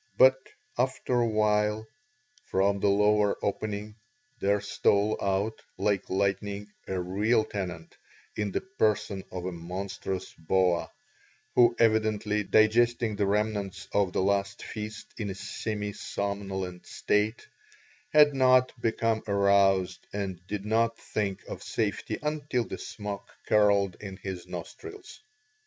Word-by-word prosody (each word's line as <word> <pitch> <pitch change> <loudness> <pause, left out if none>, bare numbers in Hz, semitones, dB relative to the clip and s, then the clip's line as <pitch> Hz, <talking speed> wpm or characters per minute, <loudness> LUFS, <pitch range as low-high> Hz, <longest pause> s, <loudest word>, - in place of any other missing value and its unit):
But 130 +1 +8 0.5
after 125 -1 +1
a 120 - +2
while 105 0 +2 0.6
from 100 +1 +1
the 100 - +3
lower 105 0 +3
opening 105 +1 -3 0.4
there 100 +1 +2
stole 100 +1 +2
out, 100 +3 0 0.2
like 100 -3 0
lightning, 100 +1 -1 0.2
a 95 -1 -2
real 105 +6 +2
tenant, 90 -5 -5 0.4
in 105 -2 -1
the - - -1
person 110 - 0
of 90 -1 -5
a 95 - -2
monstrous 95 +2 -5
boa, 90 +1 +1 0.6
who 120 -1 +5
evidently, 110 -2 +2
digesting 110 +1 +3
the 100 -1 +1
remnants 105 -1 -1
of 100 -3 +2
the 95 - 0
last 100 0 0
feast 105 -1 -6
in 105 -2 -2
a 95 - -4
semi 105 +1 -4
somnolent 95 -3 -4
state, 105 +3 0 0.6
had 150 -1 +6
not 130 -1 +5
become 115 -1 +1
aroused 100 -2 +3
and 95 -3 -4
did 105 0 -4
not 115 +1 +2
think 100 -3 -3
of - - -7
safety - - -2
until 145 -5 -1
the - - -7
smoke 105 -2 -6 0.2
curled 100 -3 +3
in 95 -2 -7
his 95 -2 -6
nostrils. 405 - -9
105 Hz, 125 wpm, -28 LUFS, 95-110 Hz, 0.6 s, But